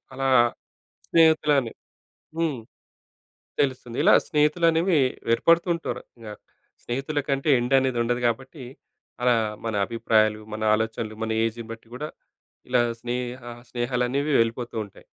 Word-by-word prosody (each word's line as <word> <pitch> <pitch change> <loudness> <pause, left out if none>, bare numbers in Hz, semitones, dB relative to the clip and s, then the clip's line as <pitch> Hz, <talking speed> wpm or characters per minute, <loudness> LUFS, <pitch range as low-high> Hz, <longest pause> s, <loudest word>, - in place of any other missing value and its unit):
అలా 135 0 0 0.8
స్నేహితులని 150 -6 +3 0.7
హ్మ్. 155 -7 -1 1.0
తెలుస్తుంది. 130 -3 -2
ఇలా - - +6
స్నేహితులనేవి, 165 +3 +2 0.4
ఏర్పడుతుంటారు. 170 +4 +1 0.2
యాహ్! 105 -1 -9 0.4
స్నేహితుల 135 +5 -2
కంటే 135 +2 0
ఎండ్ 125 +3 +1
అనేది 130 -2 -1
ఉండదు 120 +1 -1
కాబట్టి, 130 +4 -4 0.6
అలా 125 -1 +4 0.3
మన 110 -2 -2
అభిప్రాయాలు, 110 -2 +1
మన 110 - -5
ఆలోచనలు, 110 0 -2
మన 110 - -2
ఏజ్‌ని 115 +1 -3
బట్టి 115 0 -10
గూడా, 150 +5 -5 0.6
ఇలా 125 -1 +4 0.2
స్నేహ 125 +1 -4 0.3
స్నేహాలనేవి 125 +4 -1
వెళ్ళిపోతుంటాయి. 115 -3 -3
125 Hz, 105 wpm, -25 LUFS, 115-150 Hz, 1.0 s, ఇలా